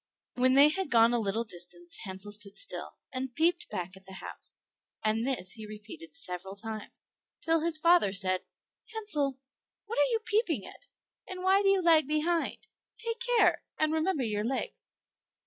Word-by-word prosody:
When 255 +1 +3
they 285 +2 +9
had 380 +1 -2
gone 230 -1 +5
a 240 - +2
little 220 +1 -1
distance 175 -4 -7
Hansel 190 +2 +1
stood 205 -1 +4
still, - - -4 0.2
and 255 -1 -4
peeped 345 +3 +1
back 180 +1 -5
at 190 0 -17
the 190 - -12
house; - - -9 0.4
and 220 +3 +1
this 240 -9 -1
he 220 0 -7
repeated 210 -7 -11
several 180 +2 -3
times, 220 +1 -7 0.3
till 330 0 +2
his 325 0 +5
father 335 - +4
said, 185 -2 +1 0.5
"Hansel, 300 - -1 0.5
what 455 +3 -3
are - - +4
you 455 -2 0
peeping 345 - 0
at, - - -12 0.4
and 370 -1 -6
why 385 +1 +4
do 400 - +1
you 390 -2 +3
lag 320 -4 +5
behind? 325 +6 -1 0.3
Take 460 0 -3 0.2
care, - - +4 0.2
and 310 0 +1
remember 320 -2 0
your 210 -2 -1
legs." 265 - -4
260 Hz, 170 wpm, -29 LUFS, 205-340 Hz, 0.5 s, they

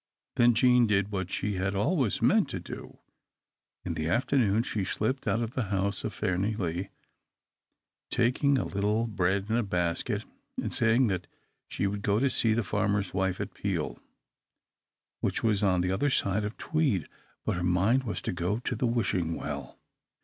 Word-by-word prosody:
Then 120 -1 +5
Jean 125 0 +5
did 100 -1 +1
what 95 -3 -2
she 105 0 -2
had 95 +2 -1
always 130 - +1
meant - - +4
to - - -4
do. - - -9 0.9
In - - -2
the 80 +1 -2
afternoon 115 -1 +2
she 105 -4 -2
slipped 110 +7 -2
out 115 - +1
of 115 - -4
the 130 - -1
house 100 0 -1
of - - -2
Fairnilee, 95 -1 -1 1.2
taking 130 +4 +2
a - - 0
little 105 +3 0
bread 95 -2 0
in 110 - 0
a - - +3
basket, 90 -5 -1 0.3
and - - -2
saying 115 +3 +4
that 90 -3 -2 0.4
she, - - -2
would 100 +1 -2
go 105 +1 +2
to 135 +1 +2
see 110 -3 +2
the 120 - +1
farmer's 100 -1 0
wife 95 -1 0
at - - -4
Peel, - - -2 1.2
which - - -1
was 105 -3 +2
on 95 -3 +3
the 90 +1 0
other 145 +10 +1
side 105 -5 +1
of 105 - -5
Tweed. 140 - 0 0.4
But - - 0
her 90 - -2
mind 95 +9 +3
was 110 -5 -3
to - - -2
go 90 +4 -1
to 125 +1 -3
the 120 +3 0
Wishing 95 -8 0
Well. 70 -3 -6
105 Hz, 175 wpm, -29 LUFS, 95-115 Hz, 1.2 s, Then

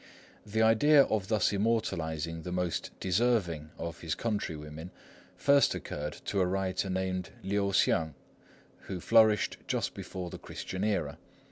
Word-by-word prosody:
The 110 +2 +1
idea 140 +6 +6
of 105 -6 -1
thus 105 -1 +2
immortalising 85 -7 -1
the 90 - -6
most 90 -1 -2
deserving 95 -6 +1
of 85 0 -5
his 80 -2 -2
countrywomen 80 -7 -4 0.5
first 140 0 +4
occurred 75 +1 -5
to 100 - 0
a - - +3
writer 95 0 -1
named 95 -1 -2
Liu 100 0 0
Hsiang, 80 -5 +2 0.7
who 95 - -4
flourished 110 +2 +4
just - - -1
before 90 -2 -6
the - - -8
Christian 95 +1 -5
era. 90 -9 -1
95 Hz, 135 wpm, -30 LUFS, 85-110 Hz, 0.7 s, idea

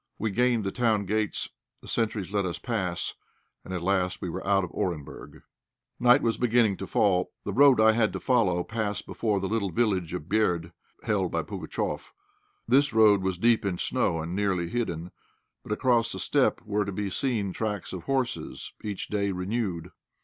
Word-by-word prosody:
We 110 -1 -1
gained 120 +1 +2
the 95 - -2
town 110 -4 +1
gates; 105 +1 -1 0.3
the - - -15
sentries 105 -4 -1
let 100 -1 +1
us 90 -2 -3
pass, 95 -8 -2 0.5
and - - -10
at 90 -2 -3
last 95 -1 +1
we 90 - -4
were - - -5
out 100 -1 +3
of 90 - -5
Orenburg. 80 -6 -5 0.6
Night 125 +3 +5
was 115 -2 +1
beginning 115 -4 +3
to 95 - -6
fall. 95 -3 +2
The 100 - -3
road 140 -1 +6
I 110 0 +7
had 110 -2 +2
to 95 - -3
follow 95 -9 +2
passed 110 -1 -3
before 105 -3 -1
the 95 - -2
little 105 -1 0
village 95 -4 0
of 90 - -4
Berd, 90 -5 +1 0.3
held - - 0
by - - -1
Pugatchéf. - - -4 0.5
This 135 +2 +4
road 105 -3 +6
was 95 -1 -1
deep 115 +4 +3
in 95 -3 -1
snow, 80 - 0
and 85 +2 -5
nearly 95 -4 0
hidden; 90 -7 -3 0.5
but - - -10
across 120 +1 +2
the - - -3
steppe - - +2
were 105 0 0
to 100 - -4
be 100 0 -3
seen 110 -8 -1
tracks 105 -5 -3
of 90 -3 -6
horses 130 -3 -2
each 105 -3 -4
day 100 -1 -1
renewed. 90 -2 -3
100 Hz, 185 wpm, -27 LUFS, 90-115 Hz, 0.6 s, I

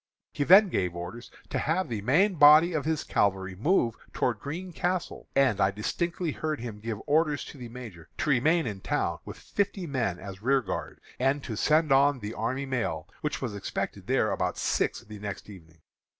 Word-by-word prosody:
"He 145 - 0
then 195 +6 +7
gave 90 - -1
orders 90 +8 -7 0.2
to - - -1
have 175 +5 0
the 110 -4 -3
main 170 - +3
body 155 +2 +7
of 150 -3 -1
his 160 -1 0
cavalry 95 -1 0
move 120 - +2 0.2
towards 115 -5 0
Green 175 - -6
Castle; 180 +1 -2
and 130 -7 +3
I 95 - +4
distinctly 170 - -2
heard 155 +1 -3
him 115 -3 -6
give 110 0 -4
orders 150 -1 +2
to 140 - -11
the 120 -2 -7
Major 115 -9 -10
to - - -1
remain 155 +6 +3
in 105 -4 -4
town - - -1
with - - -8
fifty 200 -2 -2
men 120 - -1
as 95 +1 -9
rearguard, 130 -5 -1 0.2
and 135 +2 +1
to 110 - -5
send 155 +6 +2
on 140 +1 +5
the 105 -2 -6
army 130 +5 -2
mail, 110 - -2
which 150 -2 -3
was 120 -5 -3
expected 100 - -4
there - - +2
about - - -1
six - - 0
the 105 -1 -11
next 105 0 -6
evening. 80 -4 -15
130 Hz, 190 wpm, -28 LUFS, 105-155 Hz, 0.2 s, then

